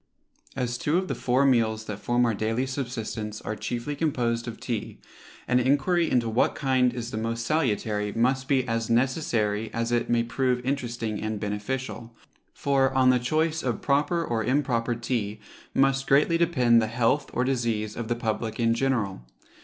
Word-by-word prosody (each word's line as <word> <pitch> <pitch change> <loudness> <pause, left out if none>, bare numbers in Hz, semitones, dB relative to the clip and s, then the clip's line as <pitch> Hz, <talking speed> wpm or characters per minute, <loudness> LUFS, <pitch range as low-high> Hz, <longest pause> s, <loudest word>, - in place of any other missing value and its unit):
As 125 -2 -2
two 150 +4 +1
of 185 0 -1
the - - 0
four 130 +2 +1
meals 110 -4 +2
that 105 -2 -5
form 120 +3 +1
our 115 - +1
daily 110 +5 -1
subsistence 115 -5 -4
are 105 - -4
chiefly 120 +6 -4
composed 125 -6 -1
of 115 -1 -6
tea, 115 -4 -4 0.5
an 125 - +3
enquiry 145 +7 +2
into 120 -2 +2
what 115 +2 +1
kind 130 -3 +2
is 120 -1 -5
the 110 - -3
most 115 +1 -2
salutary 110 -8 0
must 130 +4 +1
be 130 -2 +2
as 115 -1 -1
necessary 115 -4 +1
as 115 +1 -1
it 120 -1 0
may 120 -1 +3
prove 125 +1 -1
interesting 120 -5 -2
and 110 -1 -3
beneficial; 115 +3 -4 0.4
for, 135 -1 +1
on 130 -1 +5
the 125 - +3
choice 155 +5 0
of 120 -4 -2
proper 145 +4 +1
or 115 -4 -1
improper 125 -2 0
tea 115 -3 -2 0.4
must 135 0 +2
greatly 145 +4 +4
depend 125 -9 +4
the 110 - 0
health 120 +5 +1
or 125 - 0
disease 115 -5 -1
of 120 -1 -4
the 120 - 0
public 110 -1 -3
in 115 -1 +3
general. 115 - -1
120 Hz, 175 wpm, -26 LUFS, 115-135 Hz, 0.5 s, on